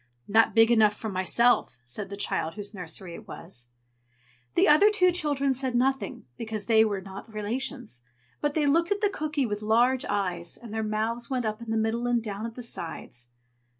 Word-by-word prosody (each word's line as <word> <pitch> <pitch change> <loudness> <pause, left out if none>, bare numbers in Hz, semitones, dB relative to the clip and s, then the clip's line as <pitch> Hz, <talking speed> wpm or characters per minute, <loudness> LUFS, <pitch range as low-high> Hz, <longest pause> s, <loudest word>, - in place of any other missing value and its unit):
"Not 225 +3 +4
big 225 +1 +6
enough 215 -3 +5
for 220 - -5
myself!" 190 - +2
said 190 +11 -5
the 200 - -6
child 165 -5 -1
whose 205 0 -7
nursery 180 -1 -5
it - - -10
was. 125 -8 -6 0.9
The - - +5
other 305 +8 +7
two 365 -4 +4
children 285 -5 +1
said 260 -1 -2
nothing, 255 - 0
because 220 -2 -4
they 220 -1 +5
were 205 -3 -1
not 195 +3 -10
relations; 220 - -4 0.4
but 295 -1 0
they 305 -2 +2
looked 335 +4 +3
at 405 0 0
the 410 -2 +2
cooky 305 -5 -1
with 210 -2 -3
large 240 +4 +3
eyes, 180 -4 -2
and 230 -3 -10
their 220 - -1
mouths 220 +2 -2
went 255 -3 -1
up 215 +1 -3
in 235 - -8
the 225 - +1
middle 225 +2 0
and 240 -1 +2
down 215 0 -4
at 230 - -10
the 245 - -7
sides. 160 - -6
225 Hz, 195 wpm, -27 LUFS, 205-260 Hz, 0.9 s, other